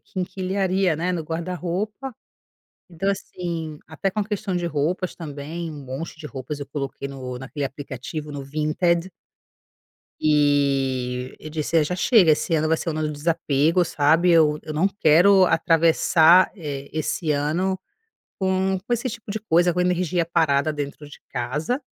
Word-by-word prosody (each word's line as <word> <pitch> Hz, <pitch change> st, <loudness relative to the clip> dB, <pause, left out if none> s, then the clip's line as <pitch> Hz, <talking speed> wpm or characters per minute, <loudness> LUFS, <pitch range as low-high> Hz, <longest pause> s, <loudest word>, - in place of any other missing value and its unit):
quinquilharia, 185 Hz, -1 st, -1 dB
né, 180 Hz, +3 st, -1 dB
no 175 Hz, -, -2 dB
guarda-roupa. 180 Hz, -, -4 dB, 0.8 s
Então, 185 Hz, +4 st, -1 dB
assim, 170 Hz, -5 st, -5 dB
até 160 Hz, +5 st, -2 dB
com 215 Hz, -, -2 dB
a 205 Hz, -, 0 dB
questão 205 Hz, -2 st, -3 dB
de 175 Hz, -1 st, -1 dB
roupas 170 Hz, +4 st, -1 dB
também, 160 Hz, +1 st, -6 dB
um 150 Hz, -2 st, -8 dB
monte 135 Hz, +5 st, -6 dB
de 155 Hz, -, -7 dB
roupas 145 Hz, +1 st, -6 dB
eu 140 Hz, -, -5 dB
coloquei 140 Hz, -1 st, -5 dB
no 130 Hz, -2 st, -6 dB
naquele 135 Hz, +2 st, -5 dB
aplicativo, 145 Hz, +2 st, -6 dB
no 140 Hz, -1 st, -6 dB
Vinted. 165 Hz, +5 st, 0 dB, 1.1 s
E 135 Hz, -4 st, +1 dB
eu 155 Hz, -, -9 dB
disse: 155 Hz, +1 st, -2 dB
"Ah, 160 Hz, -, +5 dB
já 180 Hz, -, -2 dB
chega, 185 Hz, -3 st, +5 dB
esse 155 Hz, -, -1 dB
ano 155 Hz, 0 st, +2 dB
vai 160 Hz, -, +2 dB
ser 170 Hz, -, -5 dB
o -, -, +2 dB
ano 155 Hz, 0 st, -2 dB
do 150 Hz, 0 st, -1 dB
desapego", 160 Hz, +2 st, +1 dB
sabe, 160 Hz, +3 st, +3 dB
eu 155 Hz, -2 st, +4 dB
eu 155 Hz, -1 st, -6 dB
não 175 Hz, +6 st, +3 dB
quero 190 Hz, +1 st, +5 dB
atravessar, 165 Hz, +1 st, +5 dB
eh, 140 Hz, -5 st, -6 dB
esse 155 Hz, 0 st, -2 dB
ano 165 Hz, +6 st, 0 dB, 0.6 s
com 190 Hz, 0 st, +1 dB
com 240 Hz, -, 0 dB
esse 240 Hz, +2 st, -1 dB
tipo 220 Hz, -2 st, -7 dB
de 220 Hz, -, -3 dB
coisa, 175 Hz, -4 st, +2 dB
com 180 Hz, -, 0 dB
energia 180 Hz, -1 st, +1 dB
parada 155 Hz, -3 st, +2 dB
dentro 145 Hz, 0 st, -6 dB
de -, -, -13 dB
casa. 145 Hz, -, -2 dB
160 Hz, 160 wpm, -23 LUFS, 145-180 Hz, 1.1 s, Ah